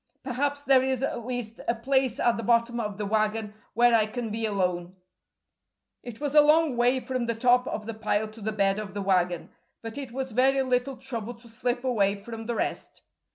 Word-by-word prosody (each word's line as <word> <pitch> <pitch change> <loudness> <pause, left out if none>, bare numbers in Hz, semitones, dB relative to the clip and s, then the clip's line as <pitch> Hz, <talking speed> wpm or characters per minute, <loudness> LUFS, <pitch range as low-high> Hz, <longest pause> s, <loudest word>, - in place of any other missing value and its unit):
Perhaps 285 +2 -1
there 270 -2 +5
is 260 0 -1
at 240 -3 -3
least 245 -3 -5
a 235 - +2
place 260 +2 0
at 240 - +3
the - - -4
bottom 235 +1 +2
of 210 -3 -3
the 210 - -3
wagon 215 0 0 0.2
where 240 +1 +5
I 220 -2 +4
can 230 0 -4
be 225 +1 -1
alone." 180 -3 -1 1.1
It 240 -2 -9
was 290 -1 -2
a 300 - +8
long 305 -2 +4
way 245 +2 +3
from 255 -2 -3
the 230 - 0
top 250 +2 +3
of 215 - -4
the 230 - -4
pile 215 0 -1
to 215 +1 -14
the 220 +2 -2
bed 200 -1 +1
of 205 -2 -7
the 200 - -2
wagon, 180 -3 +1 0.3
but 225 +4 -6
it 270 -4 -7
was 265 +1 -4
very 265 +3 +3
little 255 +1 0
trouble 240 -3 -5
to 235 +1 -18
slip 245 +2 -2
away 205 -6 +2
from 225 +2 -8
the 240 - -1
rest. - - -4
235 Hz, 210 wpm, -27 LUFS, 215-255 Hz, 1.1 s, a